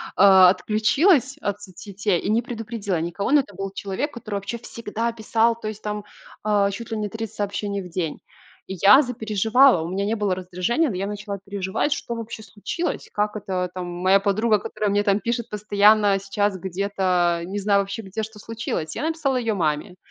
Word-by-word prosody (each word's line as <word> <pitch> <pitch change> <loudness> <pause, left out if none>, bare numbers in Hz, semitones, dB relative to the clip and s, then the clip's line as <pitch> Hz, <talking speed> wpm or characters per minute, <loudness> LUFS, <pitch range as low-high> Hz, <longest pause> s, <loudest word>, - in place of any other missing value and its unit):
а, 190 -2 +8
отключилась 270 - +2
от 205 0 -3
соцсетей 200 0 -3
и - - -3
не 220 +2 +3
предупредила 225 -6 -4
никого. 175 +7 -2
Но 295 - +6
это 205 -7 -14
был 195 +2 -4
человек, 200 +10 -3
который 215 -4 -6
вообще 200 +4 -4
всегда 230 0 -4
писал, 230 +1 +1
то 215 - -5
есть 215 0 -6
там, 210 0 -3 0.4
а, 205 -1 +2
чуть 230 +3 -7
ли 225 - -1
не 210 -1 -2
30 220 0 -6
сообщений 200 0 -2
в 180 - -9
день. 165 -3 -3 0.5
И 190 - -5
я 210 +8 +9
запереживала, 225 - +3
у 165 - -4
меня 195 +2 -1
не 215 +2 0
было 205 -4 0
раздражения, 185 - 0
но 205 - -4
я 195 +2 -2
начала 205 -1 -5
переживать, 195 +8 -2
что 235 - -2
вообще 225 -1 -7
случилось, 225 - -4
как 210 +1 -1
это 185 -3 -2
там 180 -1 -5
моя 185 +3 +3
подруга, 210 +2 +2
которая 210 +1 -2
мне 205 +1 +2
там 200 -1 +2
пишет 235 +1 -2
постоянно, 205 -1 +4
сейчас 200 0 -1
где-то- 185 -2 0
не 200 - -4
знаю 200 0 +3
вообще, 200 +3 -5
где, 195 +3 -5
что 215 0 -8
случилось. 220 -8 -4
Я - - -3
написала 315 -4 0
ее 230 -3 0
маме, 165 +1 -1
205 Hz, 190 wpm, -23 LUFS, 195-225 Hz, 0.5 s, я